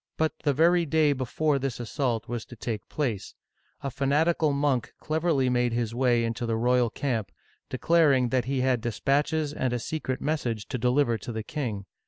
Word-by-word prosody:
But 160 0 +1
the 145 - +2
very 170 +4 +3
day 155 -1 +3
before 140 +3 0
this 135 -3 -3
assault 120 -1 -2
was 120 -1 -4
to 120 - -12
take 110 -2 -5
place, 125 -10 -3 0.5
a 140 - -3
fanatical 150 +4 +2
monk 140 -4 0
cleverly 155 -4 +1
made 125 -1 +1
his 115 -1 -1
way 120 -1 +2
into 115 +1 -2
the 115 - 0
royal 125 +1 +3
camp, 115 - -2 0.4
declaring 140 -3 +3
that 125 -1 +1
he 135 0 -1
had 130 -2 +2
dispatches 145 +6 0
and 130 -4 -1
a - - +1
secret 130 +1 -3
mes 155 0 -1
sage 115 -4 -3
to 125 - -3
deliver 125 -1 +2
to 120 - -6
the 110 -1 -4
king. 115 -9 -4
130 Hz, 185 wpm, -27 LUFS, 120-145 Hz, 0.5 s, very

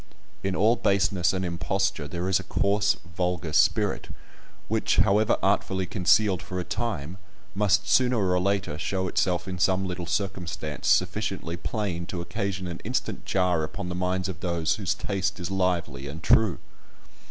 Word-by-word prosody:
In 95 -1 -1
all 110 +5 +3
baseness 100 -3 +2
and 95 -1 -2
imposture 85 -2 -1
there 85 +5 -3
is 95 0 +3
a - - -6
coarse, 100 +1 +2 0.2
vulgar 90 -3 -1
spirit, - - +2 0.6
which, 110 0 +1
however 110 +2 +4
artfully 95 -1 +1
concealed 95 0 +3
for 90 0 -5
a - - -2
time, 100 -6 -3 0.3
must 100 0 +2
sooner 125 +5 +4
or 90 -3 +2
later 95 -5 -1
show 95 +2 -1
itself 90 0 0
in 90 -1 -4
some 95 +2 +2
little 90 -2 -4
circumstance 85 -6 -3
sufficiently 95 -2 +1
plain 85 -2 -3
to 90 - -4
occasion 95 +2 -3
an 85 -1 -6
instant - - -3
jar 90 -4 +2
upon 90 +3 -5
the - - -3
minds 90 +1 -1
of 90 -5 -6
those 85 -2 0
whose 95 -5 -1
taste 100 0 -2
is 90 +1 -4
lively 90 -7 -1
and 80 +3 -8
true. 105 +2 +4
95 Hz, 160 wpm, -26 LUFS, 85-100 Hz, 0.6 s, however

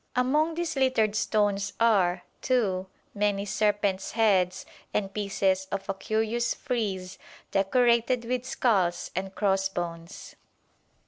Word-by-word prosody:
Among 300 +6 +2
these 335 -2 -2
littered 255 -6 +2
stones 205 -2 +1
are, 190 -6 +3 0.2
too, 195 -7 0 0.3
many 205 -1 0
serpents' 200 -1 0
heads 190 -5 +2 0.3
and 195 -2 -1
pieces 195 -2 0
of 195 -1 -3
a 195 - 0
curious 220 +4 -1
frieze 190 -6 -3 0.3
decorated 235 +4 +2
with 250 +1 -1
skulls 195 -9 0
and 190 +1 -4
crossbones. 190 -3 -2
205 Hz, 110 wpm, -27 LUFS, 190-235 Hz, 0.3 s, are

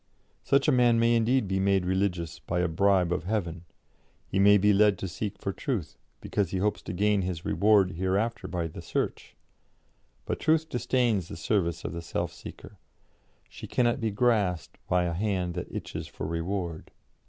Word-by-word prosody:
Such 140 +1 +2
a - - +5
man 120 -3 +4
may 115 +1 +3
indeed 115 0 +2
be 95 0 0
made 95 -1 +2
religious 90 -3 -1
by 90 +1 -2
a 90 - +2
bribe 90 +1 +2
of - - -3
heaven; 90 -5 -2 0.6
he 95 - -2
may 100 +1 +7
be 105 +1 +4
led 105 -1 +4
to 95 - -4
seek 100 +4 -5
for 100 - -4
truth, 110 - -3 0.3
because 100 -5 -1
he 95 - -2
hopes 105 +3 0
to - - -6
gain 105 +2 +2
his 90 -2 -4
reward 100 -2 +3
hereafter 95 +4 -1
by 90 -2 -2
the 80 - -7
search; - - -3 0.9
but - - -3
Truth 160 0 +2
disdains 120 - 0
the - - -8
service 85 -2 -1
of - - -3
the 85 - -5
self 85 - -3
seeker; - - -11 0.7
she - - -10
cannot 120 +1 +1
be 110 - +1
grasped 105 -6 0
by 90 0 +2
a 85 -1 -1
hand 90 -1 -1
that 90 0 -6
itches - - -5
for - - -7
reward. 85 0 -3
95 Hz, 180 wpm, -28 LUFS, 90-110 Hz, 0.9 s, may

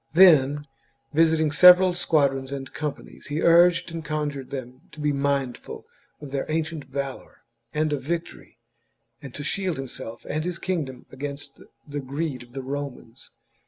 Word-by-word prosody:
Then, 145 -5 +6 0.5
visiting 160 0 +3
the - - -5
several 180 0 +8
squadrons 140 -6 +1
and 135 -1 -6
companies, 150 -2 -6
he 145 +2 -2
urged 170 0 +5
and 165 -1 -5
conjured 150 -3 -3
them 130 -1 -7
to 155 - -12
be 150 0 +1
mindful 140 -2 -2 0.3
of 145 -2 -9
their 135 -1 -2
ancient 160 -1 -2
valour 135 0 -6 0.3
and 155 0 0
of 140 - -2
victory, 165 +5 -5 0.6
and 140 - -8
to 145 - -5
shield 185 0 -1
himself 120 -3 -7
and 155 +1 -2
his 175 0 -3
kingdom 160 -9 -3
against 140 +1 -6 0.3
the 145 0 -4
greed 140 +1 -3
of 120 0 -15
the 135 0 -5
Romans. 135 -3 -6
145 Hz, 155 wpm, -25 LUFS, 135-160 Hz, 0.6 s, several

